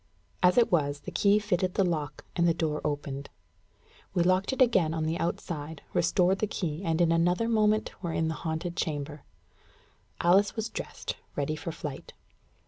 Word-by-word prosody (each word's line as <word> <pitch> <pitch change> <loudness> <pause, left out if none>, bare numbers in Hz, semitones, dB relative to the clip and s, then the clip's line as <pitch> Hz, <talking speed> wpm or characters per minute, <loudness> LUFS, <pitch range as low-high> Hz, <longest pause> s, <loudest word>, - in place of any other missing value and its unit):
As 180 +3 +4
it 240 - +5
was, 145 -4 +1
the 185 - -7
key 200 +4 +4
fitted 185 -3 0
the 195 - +3
lock, 150 -5 -2
and 170 -1 +3
the 165 - +3
door 155 -2 -1
opened. 140 -1 -3 0.9
We 175 - +4
locked 185 +4 +2
it 265 - -4
again 190 -11 +4
on 160 - -1
the 160 +2 -1
outside, 160 -3 -4
restored 180 +2 +3
the 215 - +1
key, 170 -6 -3
and 165 -2 0
in 170 -1 +4
another 175 +6 +2
moment 215 -1 +1
were 170 -3 -2
in 160 0 0
the 160 - -1
haunted 165 +2 -3
chamber. 145 -2 -3 1.0
Alice 195 +5 +4
was 220 0 -2
dressed, - - -5 0.2
ready 145 +2 -1
for 160 +2 -5
flight. 150 -4 -7
170 Hz, 175 wpm, -29 LUFS, 155-190 Hz, 1.0 s, it